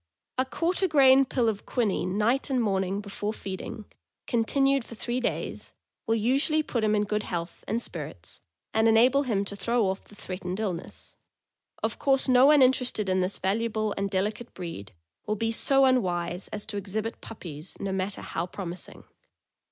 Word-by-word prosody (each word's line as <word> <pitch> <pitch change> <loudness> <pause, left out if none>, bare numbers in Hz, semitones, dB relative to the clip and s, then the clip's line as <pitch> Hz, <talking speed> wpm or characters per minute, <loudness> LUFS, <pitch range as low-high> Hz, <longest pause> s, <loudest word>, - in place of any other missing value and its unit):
A 260 - +3
quarter 345 +7 0
grain 275 -4 +6
pill 245 -2 0
of 210 -2 -2
quinine 200 -5 0
night 240 +7 +2
and 260 -2 +1
morning 195 -3 0
before 205 +1 -4
feeding, 200 +2 -6 0.4
continued 270 +3 +2
for 230 - -11
three 240 +3 -2
days, 250 - -3 0.3
will 225 - +3
usually 275 +7 +2
put 235 -6 -2
him 215 0 +3
in 210 - +2
good 210 +1 -1
health 170 -4 -5
and 225 +3 0
spirits 150 - -7 0.3
and 220 +1 +4
enable 240 +5 +5
him 215 -7 0
to 200 - -6
throw 230 +3 +1
off 190 +1 -2
the 205 - -17
threatened 185 0 -5
illness. 185 -6 -5 0.7
Of - - -1
course 270 -1 +2
no 255 +1 +6
one 295 -2 +7
interested 250 -5 +2
in 185 0 +2
this 185 +2 -1
valuable 215 +2 0
and 200 0 -1
delicate 210 +5 -2
breed 165 - -7 0.4
will 215 - +1
be 225 +2 0
so 270 +4 +3
unwise 180 -8 +1
as 210 -1 -6
to 215 -2 -4
exhibit 210 +3 -4
puppies, 165 -6 -8
no 195 - -2
matter 190 +1 -2
how 170 +2 -3
promising. 180 -1 -7
215 Hz, 170 wpm, -27 LUFS, 190-250 Hz, 0.7 s, one